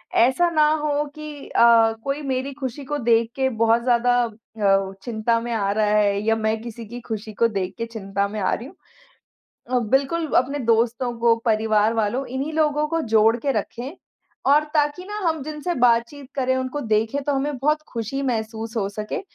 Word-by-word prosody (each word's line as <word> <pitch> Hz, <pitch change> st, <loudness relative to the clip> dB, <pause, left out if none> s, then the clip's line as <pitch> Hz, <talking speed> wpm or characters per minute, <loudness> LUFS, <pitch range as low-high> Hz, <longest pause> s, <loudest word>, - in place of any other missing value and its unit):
ऐसा 265 Hz, +9 st, +4 dB
ना 310 Hz, -2 st, +3 dB
हो 295 Hz, 0 st, 0 dB
कि 305 Hz, -2 st, -8 dB
अ, 230 Hz, -1 st, +5 dB
कोई 275 Hz, +2 st, -2 dB
मेरी 265 Hz, -1 st, -2 dB
खुशी 265 Hz, 0 st, -5 dB
को 295 Hz, +2 st, -2 dB
देख 230 Hz, -3 st, +2 dB
के 265 Hz, -1 st, +1 dB
बहुत 230 Hz, +1 st, +4 dB
ज़्यादा 245 Hz, 0 st, +3 dB
अ, 205 Hz, -3 st, -1 dB
चिंता 230 Hz, 0 st, 0 dB
में 240 Hz, +1 st, -5 dB
आ 200 Hz, -3 st, 0 dB
रहा 215 Hz, +1 st, +1 dB
है 205 Hz, -1 st, +2 dB
या 225 Hz, 0 st, +3 dB
मैं 220 Hz, 0 st, -1 dB
किसी 235 Hz, 0 st, -8 dB
की 240 Hz, +3 st, -7 dB
खुशी 220 Hz, -2 st, -6 dB
को 230 Hz, +3 st, +3 dB
देख 195 Hz, -4 st, -3 dB
के 230 Hz, -, -2 dB
चिंता 200 Hz, -3 st, -3 dB
में 210 Hz, +1 st, -5 dB
आ 185 Hz, -, +1 dB
रही 240 Hz, -, -4 dB
हूँ। -, -, -15 dB, 1.0 s
अ, 255 Hz, -, +3 dB
बिल्कुल 270 Hz, +8 st, +1 dB
अपने 275 Hz, +3 st, +1 dB
दोस्तों 235 Hz, 0 st, +1 dB
को 230 Hz, 0 st, +4 dB
परिवार 220 Hz, -1 st, +2 dB
वालों 225 Hz, +4 st, 0 dB
इन्हीं 270 Hz, +5 st, -4 dB
लोगों 300 Hz, -1 st, +1 dB
को 330 Hz, +1 st, 0 dB
जोड़ 220 Hz, +1 st, +5 dB
के 275 Hz, +3 st, -1 dB
रखें, 260 Hz, +6 st, -4 dB, 0.5 s
और 290 Hz, +3 st, +5 dB
ताकि 295 Hz, +3 st, +1 dB
ना 415 Hz, +2 st, -5 dB
हम 320 Hz, -3 st, -1 dB
जिनसे 305 Hz, +4 st, -4 dB
बातचीत 245 Hz, +2 st, +1 dB
करें 260 Hz, -1 st, +1 dB
उनको 260 Hz, +2 st, -3 dB
देखें 225 Hz, +3 st, 0 dB
तो 290 Hz, -, 0 dB
हमें 280 Hz, +1 st, -1 dB
बहुत 300 Hz, +3 st, +1 dB
खुशी 235 Hz, +3 st, -4 dB
महसूस 225 Hz, -2 st, -3 dB
हो 200 Hz, -3 st, 0 dB
सके 210 Hz, +1 st, -4 dB
240 Hz, 190 wpm, -23 LUFS, 220-280 Hz, 1.0 s, अ